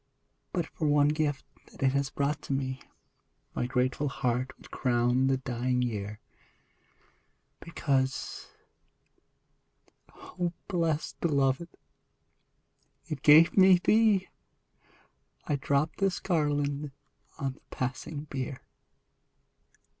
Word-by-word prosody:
But 175 -3 -1
for 160 -1 -3
one 145 0 +4
gift 150 -2 -1 0.3
that - - -7
it 135 - +4
has 140 0 0
brought 140 +2 -1
to - - -4
me 130 -1 -2 0.7
My 120 - -1
grateful 130 +3 0
heart 130 0 -1
would - - -17
crown 125 +1 +2
the 135 0 +2
dying 125 0 -1
Year: 105 -3 -4 1.4
Because, 135 -6 -2 1.7
O 175 -1 -4
best 165 -4 -1
beloved, 140 +1 +1 1.4
it 150 -4 -4
gave 155 +3 +7
me 190 -1 +7
thee, 210 0 +3 1.2
I 145 - 0
drop 140 +2 0
this 195 -2 0
garland 145 -4 -1 0.4
on 135 -1 -2
the - - -22
passing 145 +3 -4
bier 135 -2 -5
140 Hz, 100 wpm, -29 LUFS, 130-155 Hz, 1.7 s, gave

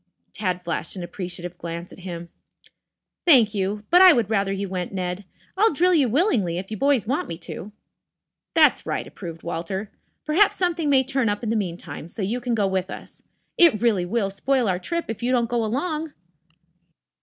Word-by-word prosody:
Tad 185 -3 -2
flashed 170 0 -3
an 185 - -5
appreciative 175 0 -6
glance 170 +1 -6
at - - -13
him. 175 -2 -7 0.9
"Thank 245 -11 +6
you. 205 +1 -2
But 355 +1 +7
I 370 -2 +10
would 225 -6 0
rather 200 -2 +1
you 195 0 -2
went, 180 -1 -4
Ned. 185 0 -4 0.3
I'll 430 +4 +4
drill 360 +5 +3
you 285 -7 +3
willingly 225 - +1
if 190 +3 -6
you 215 - -3
boys 275 -4 +2
want 265 +7 -1
me 165 - -5
to." 185 +4 -8 0.8
"That's - - +4
right," - - -2
approved 165 -4 -9
Walter. 175 +4 -4 0.3
"Perhaps 360 +7 +4
something 340 -4 0
may 265 -2 +5
turn 260 -3 0
up 205 +3 -2
in 225 - -2
the 225 - +1
meantime, 175 -5 -4
so 195 +4 -5
you 230 +6 -2
can 240 -1 -1
go 210 -3 +1
with 190 -1 -1
us. - - -10 0.4
It 330 -12 +6
really 210 -7 +1
will 200 -1 0
spoil 250 +4 0
our 180 -2 0
trip 335 - -3
if 225 0 -5
you 245 +1 0
don't 240 -2 +2
go 240 -1 +1
along." 300 +7 -2
210 Hz, 190 wpm, -23 LUFS, 180-265 Hz, 0.9 s, I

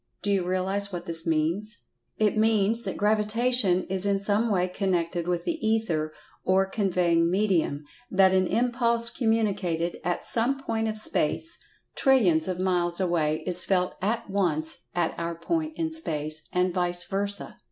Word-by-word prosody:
Do 205 - 0
you 195 -2 +1
realize 190 +3 0
what 175 -1 -6
this 165 -1 -1
means? 165 +7 -1 0.4
It 215 -1 +2
means 220 0 +2
that - - -4
Gravitation 210 -2 +3
is 190 0 +2
in 200 -1 +1
some 205 +3 +1
way 185 -3 +1
connected 175 -3 -2
with 175 -1 -1
the 330 -2 -3
Ether, 200 -9 0 0.3
or 190 +1 +3
"conveying 180 -4 +1
medium," 180 -6 0 0.3
that 190 -1 +4
an 185 -1 +2
impulse 235 -1 0
communicated 200 -8 -1
at 175 0 -2
some 240 +4 0
point 225 -4 -2
of 215 0 -3
space 215 - 0 0.4
trillions 190 - +3
of 185 -1 -2
miles 175 -2 0
away 165 -4 0
is 180 0 -2
felt 180 -2 0
at 220 +5 -1
once 170 -6 -1 0.2
at 175 -2 0
our 170 0 -3
point 315 - -3
in 325 -1 -2
space, 155 - -3
and 180 0 +1
vice 175 -1 0
versa. 200 +1 -1
190 Hz, 155 wpm, -26 LUFS, 175-220 Hz, 0.4 s, that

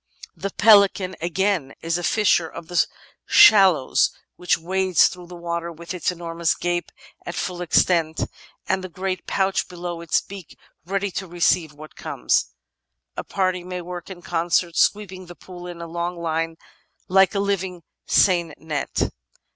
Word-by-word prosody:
The 195 - -4
Pelican, 200 -3 +4
again, 175 -4 -1
is 165 +1 0
a - - -6
fisher 175 -3 +2
of 160 - -10
the 175 - +2 0.4
shallows 190 - +6 0.3
which 180 - +1
wades 185 +1 +3
through 180 -1 -9
the 175 - -10
water 170 0 -4
with 170 +2 -8
its 180 0 -1
enormous 170 -1 -1
gape 175 0 -2 0.3
at 175 - -6
full 180 -1 -3
extent, 165 -2 +2 0.4
and 190 0 0
the 185 - -6
great 185 +1 -4
pouch 195 0 0
below 175 -1 -6
its 170 - +1
beak 195 -4 -11 0.3
ready 195 +1 -1
to 190 +1 -5
receive 170 -2 +1
what 155 +1 -13
comes. - - 0 0.7
A - - -4
party 185 -2 -1
may 180 0 -5
work 175 +1 -8
in 180 -2 -10
concert, 170 0 0
sweeping 190 -3 0
the 175 - -11
pool 180 0 -11
in 170 -1 -7
a - - -7
long 170 +1 -4
line 165 0 -2 0.5
like 190 +2 +4
a - - +1
living 190 -3 -2 0.2
seine 170 -5 +3
net. 150 -3 -2
175 Hz, 155 wpm, -23 LUFS, 170-190 Hz, 0.7 s, shallows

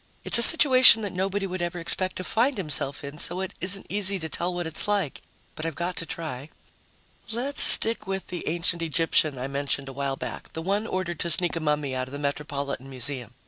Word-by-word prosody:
It's - - +6
a - - +2
situation 255 -5 +8
that 205 - -6
nobody 195 +2 -3
would 185 -1 -6
ever 175 0 -4
expect 185 +2 +2
to 185 - -6
find 240 +6 -1
himself 150 -5 0
in, 140 +2 -10
so 175 +2 -1
it 190 0 -6
isn't 190 +1 -1
easy 200 0 0
to 160 -3 -6
tell 175 +4 -3
what 175 -1 -5
it's 160 +4 -3
like. 200 -8 -3 0.3
But 155 - -9
I've 165 -2 -5
got 175 +2 -5
to 165 - -4
try. 150 -4 -8 0.8
Let's 260 +5 -2
stick 225 -2 +6
with 195 0 -5
the 175 - -7
ancient 170 +1 -2
Egyptian 160 -3 0
I 125 +2 -5
mentioned 140 0 -4
a - - -10
while 140 0 -4
back, 125 -4 -9
the 160 - -7
one 200 +5 -3
ordered 185 -4 -5
to 170 - -2
sneak 175 +1 +2
a - - -3
mummy 150 -3 -3
out 130 0 -4
of 130 - -14
the - - -6
Metropolitan 140 -2 -6
Museum. 125 -2 -5
170 Hz, 220 wpm, -24 LUFS, 140-190 Hz, 0.8 s, situation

